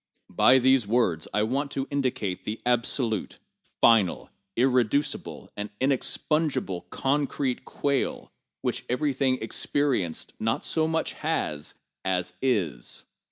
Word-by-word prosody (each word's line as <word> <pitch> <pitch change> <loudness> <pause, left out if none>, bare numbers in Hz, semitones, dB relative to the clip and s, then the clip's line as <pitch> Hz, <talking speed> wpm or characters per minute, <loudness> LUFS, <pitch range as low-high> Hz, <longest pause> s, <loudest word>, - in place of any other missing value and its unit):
By 130 - +6
these 130 -3 +4
words 100 -9 +1
I 105 - +2
want 135 +6 0
to 135 0 -2
indicate 125 -9 -1
the 110 +2 -4
absolute, 120 -2 0 0.4
final, 110 -6 +4 0.2
irreducible 130 +2 +1
and 105 0 -4
inexpugnable 135 - 0
concrete 135 0 -1
quale 140 -2 -1 0.3
which - - -1
everything 130 0 +1
experienced 120 - -1
not 115 +1 0
so 160 -1 +1
much 160 0 -1
has 115 - -2 0.3
as 90 -1 -1
is. 90 - -1
125 Hz, 110 wpm, -27 LUFS, 105-140 Hz, 0.4 s, By